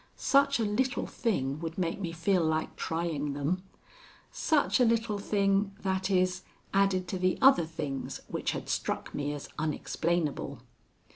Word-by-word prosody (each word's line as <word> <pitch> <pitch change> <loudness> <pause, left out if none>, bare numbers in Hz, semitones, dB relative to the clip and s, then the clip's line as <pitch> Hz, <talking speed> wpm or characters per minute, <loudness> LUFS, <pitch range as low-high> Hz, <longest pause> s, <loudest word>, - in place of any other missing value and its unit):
Such 275 -1 +3
a - - +2
little 250 +5 0
thing 140 - -1
would 165 0 -5
make 175 0 -1
me 175 -4 -3
feel 170 +2 +1
like 160 0 0
trying 160 -3 -2
them. 145 +6 -1 0.7
Such 300 -3 +2
a - - +6
little 225 -3 +1
thing 195 -1 +1
that 190 0 0
is, 185 -1 +2 0.3
added 195 -2 +2
to 185 - -2
the 185 0 +2
other 265 - +6
things 150 -4 -4
which - - -2
had - - -5
struck - - -2
me 145 0 -2
as 145 -1 -6
unexplainable. 155 -3 -1
185 Hz, 150 wpm, -30 LUFS, 160-200 Hz, 0.7 s, a